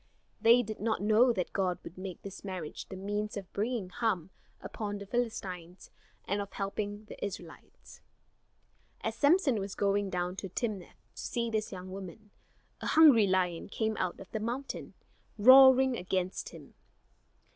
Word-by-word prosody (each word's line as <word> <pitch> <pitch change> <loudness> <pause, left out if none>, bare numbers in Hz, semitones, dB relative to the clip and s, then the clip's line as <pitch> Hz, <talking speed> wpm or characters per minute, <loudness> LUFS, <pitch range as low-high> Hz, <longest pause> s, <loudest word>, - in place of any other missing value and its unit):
They 235 +2 +6
did 215 -1 -6
not 220 -1 -1
know 220 +4 +5
that 185 -6 -3
God 185 -2 0
would 170 - -10
make 185 -1 -8
this 195 -1 -9
marriage 185 -6 -6
the 190 - -7
means 205 +2 -3
of 195 -2 -8
bringing 215 -2 -2
harm 190 -5 -1 0.3
upon 205 -2 -5
the 200 - -8
Philistines 190 -6 -4 0.3
and 200 +1 -1
of 200 - -8
helping 205 +1 -4
the - - -10
Israelites. 180 -4 -9 1.0
As - - -2
Samson 290 - +3
was 195 0 -5
going 200 0 +1
down 180 0 -2
to 190 +1 -5
Timnath 200 -2 -5
to - - -8
see 235 -1 -2
this 215 -1 -1
young 185 -1 -8
woman, 195 +2 -9 0.5
a - - -3
hungry 275 -10 +7
lion 185 -2 0
came 220 +1 -1
out 180 -2 -2
of - - -12
the 220 - -2
mountain, 245 +5 -5 0.4
roaring 260 +2 +8
against 185 -1 -2
him. - - -13
205 Hz, 155 wpm, -31 LUFS, 185-225 Hz, 1.0 s, roaring